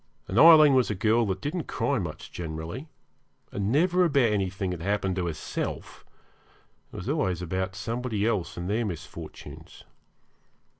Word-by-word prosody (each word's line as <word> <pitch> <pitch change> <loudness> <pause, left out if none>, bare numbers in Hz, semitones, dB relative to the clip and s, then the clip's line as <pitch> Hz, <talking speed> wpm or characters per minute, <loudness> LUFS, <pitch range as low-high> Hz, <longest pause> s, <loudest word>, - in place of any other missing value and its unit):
And 100 - +1
Aileen 155 -3 +9
was 130 -2 +3
a 105 - -1
girl 110 +3 +2
that 95 -1 -2
didn't 155 +2 -3
cry 140 -3 0
much 85 -5 -6
generally, 85 - -6 0.6
and 100 +1 -2
never 180 +6 +3
about 140 -9 +3
anything 95 -1 -1
that 90 -2 -5
happened 95 0 -1
to 90 -1 -1
herself; 80 -3 -5 0.9
it - - -13
was 90 - -6
always 95 - 0
about 95 +2 -3
somebody 115 +1 -2
else 105 -7 -1
and 85 +1 -4
their 110 +4 0
misfortunes. 90 -8 -8
105 Hz, 150 wpm, -27 LUFS, 90-130 Hz, 0.9 s, Aileen